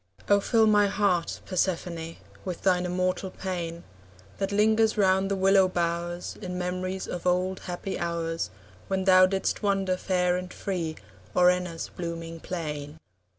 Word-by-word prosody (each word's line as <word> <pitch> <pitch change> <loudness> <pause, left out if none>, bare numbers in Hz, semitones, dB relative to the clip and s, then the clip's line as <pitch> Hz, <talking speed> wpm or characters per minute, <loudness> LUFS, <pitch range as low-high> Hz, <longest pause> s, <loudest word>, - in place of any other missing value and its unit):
Oh, 205 0 +5
fill 225 +2 +3
my 210 -1 +5
heart, 195 -4 0
Persephone, 170 -3 -2 0.3
With 180 -2 -5
thine 180 -2 +3
immortal 185 +1 -1
pain, 175 -3 -5 0.6
That 195 0 -1
lingers 220 +2 +3
round 190 -1 +3
the 200 - +1
willow 195 0 +5
bowers 175 0 -2
In 180 -2 -4
memories 185 +1 -3
of 180 0 -4
old 185 +1 +1
happy 180 +2 -5
hours, 165 -1 -2 0.4
When 190 -1 0
thou 185 -1 +7
didst 195 0 -1
wander 195 -3 +1
fair 180 -1 +1
and 180 0 -6
free 170 -5 -3 0.4
O'er 180 0 +6
Enna's 180 -2 -3
blooming 165 -1 -5
plain. 150 -4 -5
180 Hz, 145 wpm, -27 LUFS, 170-195 Hz, 0.6 s, thou